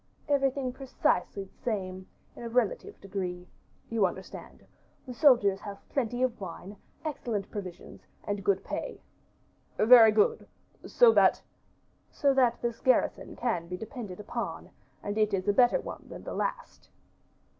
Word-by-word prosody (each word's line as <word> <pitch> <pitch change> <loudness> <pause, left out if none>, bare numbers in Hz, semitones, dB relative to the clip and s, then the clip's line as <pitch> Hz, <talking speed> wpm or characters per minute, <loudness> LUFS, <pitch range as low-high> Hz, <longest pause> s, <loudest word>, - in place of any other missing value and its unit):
"Everything 270 -2 +1
precisely 225 -7 -1
the 195 - -18
same, 190 -5 -3 0.3
in - - -11
a 235 - -5
relative 410 - -1
degree, 180 -2 -5 0.4
you 220 -4 +2
understand; 190 +2 -10 0.4
the 255 - -7
soldiers 235 -8 +4
have 200 -1 -9
plenty 245 -2 -1
of 240 -4 -1
wine, 190 +2 -8 0.3
excellent 235 -9 -3
provisions, 185 -4 -8 0.2
and 205 -1 -3
good 195 -1 +1
pay." - - -5 0.8
"Very 225 0 +8
good; 210 -1 +2 0.4
so 485 -2 +6
that - - +4 0.4
" - - -40
"So 280 -2 +4
that 255 -3 +3
this 235 -1 -2
garrison 260 -1 +1
can 180 -9 -2
be 180 +1 -5
depended 215 -3 -8
upon, 210 - -5 0.3
and 205 +1 -3
it 215 -2 +2
is 185 +1 -4
a 205 - +4
better 245 - +4
one - - -8
than - - -9
the - - -6
last." - - -4
220 Hz, 145 wpm, -29 LUFS, 195-255 Hz, 0.8 s, Very